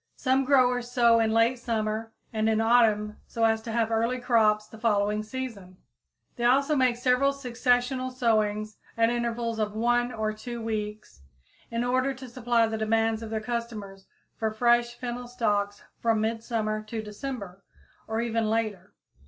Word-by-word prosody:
Some 265 Hz, 0 st, +1 dB
growers 250 Hz, -3 st, +3 dB
sow 235 Hz, -2 st, +4 dB
in 220 Hz, -1 st, +2 dB
late 230 Hz, +2 st, +3 dB
summer 225 Hz, -1 st, -2 dB, 0.2 s
and 220 Hz, 0 st, +1 dB
in 220 Hz, 0 st, +2 dB
autumn 220 Hz, -2 st, +3 dB
so 230 Hz, -, -3 dB
as 225 Hz, 0 st, +3 dB
to 225 Hz, -, -6 dB
have 230 Hz, 0 st, 0 dB
early 230 Hz, +3 st, +1 dB
crops 215 Hz, -4 st, +3 dB
the 220 Hz, 0 st, -14 dB
following 210 Hz, -2 st, +1 dB
season; 215 Hz, -6 st, -7 dB, 0.6 s
they 240 Hz, -, -3 dB
also 275 Hz, +5 st, +3 dB
make 255 Hz, -3 st, +2 dB
several 255 Hz, +2 st, +3 dB
successional 255 Hz, -1 st, 0 dB
sowings 215 Hz, -4 st, 0 dB, 0.2 s
at 230 Hz, 0 st, +3 dB
intervals 235 Hz, -1 st, -2 dB
of 210 Hz, -1 st, -1 dB
one 240 Hz, +2 st, +1 dB
or 220 Hz, -2 st, -2 dB
two 235 Hz, +2 st, -7 dB
weeks, 215 Hz, -, -5 dB, 0.5 s
in 230 Hz, 0 st, -1 dB
order 255 Hz, +2 st, +1 dB
to 260 Hz, 0 st, -9 dB
supply 235 Hz, -1 st, +1 dB
the 220 Hz, 0 st, -3 dB
demands 225 Hz, 0 st, +1 dB
of 225 Hz, -, -6 dB
their 220 Hz, 0 st, -2 dB
customers 215 Hz, -4 st, -5 dB, 0.3 s
for 220 Hz, -, 0 dB
fresh 240 Hz, +2 st, +2 dB
fennel 245 Hz, 0 st, -5 dB
stalks 205 Hz, -4 st, -1 dB, 0.2 s
from 225 Hz, -2 st, +2 dB
midsummer 220 Hz, -1 st, -1 dB
to 215 Hz, +1 st, -5 dB
December 210 Hz, -3 st, -7 dB, 0.4 s
or 220 Hz, +1 st, -1 dB
even 230 Hz, -2 st, 0 dB
later. 215 Hz, -5 st, -2 dB
230 Hz, 160 wpm, -27 LUFS, 215-245 Hz, 0.6 s, sow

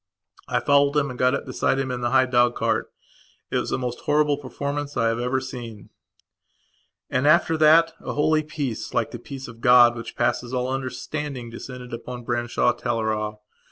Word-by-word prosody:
I -, -, +1 dB
followed 140 Hz, 0 st, +3 dB
him 140 Hz, -2 st, +1 dB
and 125 Hz, -, -9 dB
got 125 Hz, +1 st, +3 dB
up -, -, -4 dB
beside -, -, 0 dB
him 135 Hz, -1 st, -2 dB
in 125 Hz, -1 st, -4 dB
the 120 Hz, -, 0 dB
high 130 Hz, 0 st, +4 dB
dog 120 Hz, -1 st, +3 dB
cart. 110 Hz, -1 st, -1 dB, 0.6 s
It -, -, +1 dB
was -, -, -2 dB
the -, -, 0 dB
most 125 Hz, -1 st, -4 dB
horrible 150 Hz, 0 st, +2 dB
performance 140 Hz, +2 st, -5 dB
I 115 Hz, -, +2 dB
have 115 Hz, +1 st, -1 dB
ever 125 Hz, +2 st, 0 dB
seen. 120 Hz, -5 st, -8 dB, 1.2 s
And, 130 Hz, +3 st, +1 dB
after 165 Hz, +1 st, +4 dB
that, 160 Hz, +2 st, +5 dB
a -, -, -4 dB
holy 155 Hz, +1 st, +2 dB
peace, 145 Hz, -6 st, -5 dB
like -, -, 0 dB
the -, -, -7 dB
peace 135 Hz, -1 st, -8 dB
of 115 Hz, -1 st, -12 dB
God 120 Hz, -1 st, +7 dB
which 115 Hz, -, -8 dB
passes 125 Hz, +1 st, -1 dB
all 125 Hz, +1 st, -1 dB
understanding, 135 Hz, -1 st, -5 dB
descended 125 Hz, +1 st, -9 dB
upon 120 Hz, +1 st, -7 dB
Branshaw 120 Hz, 0 st, 0 dB
Teleragh. 110 Hz, -3 st, -2 dB
125 Hz, 185 wpm, -24 LUFS, 120-140 Hz, 1.2 s, God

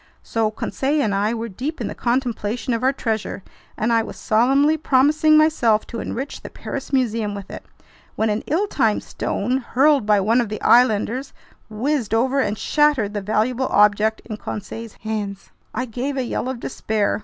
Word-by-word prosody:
So 225 Hz, -1 st, 0 dB
Conseil 275 Hz, +6 st, -1 dB
and 210 Hz, -, 0 dB
I 210 Hz, +4 st, +1 dB
were 230 Hz, 0 st, -4 dB
deep 260 Hz, -, -5 dB
in -, -, -3 dB
the -, -, -4 dB
contemplation 240 Hz, -1 st, -1 dB
of 230 Hz, -, -1 dB
our 260 Hz, +1 st, +3 dB
treasure, 220 Hz, -7 st, -3 dB, 0.3 s
and 225 Hz, +2 st, +1 dB
I 230 Hz, -, +4 dB
was 225 Hz, -, -7 dB
solemnly 270 Hz, +7 st, +3 dB
promising 305 Hz, +1 st, +4 dB
myself 270 Hz, -9 st, +3 dB
to 230 Hz, -, -6 dB
enrich 270 Hz, +4 st, -5 dB
the -, -, -8 dB
Paris 275 Hz, -, -6 dB
Museum 230 Hz, -6 st, 0 dB
with 200 Hz, -1 st, -8 dB
it, -, -, -8 dB, 0.5 s
when 220 Hz, 0 st, +1 dB
an 210 Hz, -, -1 dB
ill 340 Hz, +8 st, +1 dB
timed 230 Hz, -, 0 dB
stone, 250 Hz, +6 st, -2 dB
hurled 270 Hz, 0 st, +2 dB
by 210 Hz, -1 st, +4 dB
one 225 Hz, +5 st, +3 dB
of 230 Hz, -, -3 dB
the 215 Hz, -, -4 dB
islanders, 245 Hz, +2 st, +3 dB, 0.4 s
whizzed 230 Hz, 0 st, -1 dB
over 260 Hz, +4 st, +2 dB
and 210 Hz, -5 st, 0 dB
shattered 295 Hz, -9 st, +2 dB
the 205 Hz, -, -2 dB
valuable 230 Hz, +6 st, 0 dB
object 210 Hz, +1 st, +3 dB
in 215 Hz, -2 st, -6 dB
Conseil's 220 Hz, +2 st, -7 dB
hands. 205 Hz, -2 st, -4 dB, 0.2 s
I 255 Hz, -, -2 dB
gave 255 Hz, +4 st, -4 dB
a 260 Hz, -, 0 dB
yell 250 Hz, +1 st, -3 dB
of 260 Hz, -2 st, -4 dB
despair! 215 Hz, -5 st, -1 dB
230 Hz, 180 wpm, -21 LUFS, 215-265 Hz, 0.5 s, I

